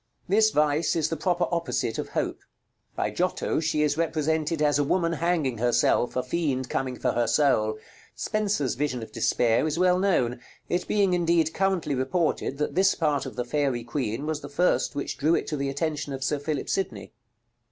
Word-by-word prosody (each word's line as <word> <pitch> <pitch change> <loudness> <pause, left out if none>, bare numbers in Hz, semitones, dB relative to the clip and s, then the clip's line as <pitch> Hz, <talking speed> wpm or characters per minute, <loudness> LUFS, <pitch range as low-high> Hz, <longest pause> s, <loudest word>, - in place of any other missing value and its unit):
This 215 +3 +4
vice 150 -3 +1
is 160 -2 +1
the 165 - -1
proper 175 +2 0
opposite 170 -9 -1
of - - -4
Hope. - - -2 0.6
By - - -1
Giotto 180 -2 0
she 155 -1 +1
is 150 +1 0
represented 160 -1 0
as 145 -1 +2
a - - +3
woman 170 +3 +1
hanging 160 -8 0
herself, 120 0 +2
a 130 - 0
fiend 130 -3 -2
coming 130 -2 -2
for - - 0
her 120 -1 0
soul. 110 -6 +2 0.4
Spenser's 200 - -1
vision 130 -3 -2
of - - -10
Despair 120 +5 +2
is 155 +1 -2
well 180 0 +3
known, 130 -11 +1 0.3
it 175 +1 -1
being 200 -3 +2
indeed 170 -2 +2
currently 190 -6 0
reported 140 +1 -1
that 150 -1 -2
this 190 +3 +3
part 150 -4 0
of - - -8
the 125 - -2
Faerie 135 -3 0
Queen 120 +1 -3
was 155 -1 -2
the 140 - -8
first 165 +1 +1
which 140 - -4
drew 155 +3 +3
to - - +4
it 150 - -3
the 140 0 -1
attention 145 0 -2
of 135 0 -4
Sir 145 +2 0
Philip 145 0 -3
Sidney. 105 - -3
150 Hz, 190 wpm, -26 LUFS, 130-170 Hz, 0.6 s, This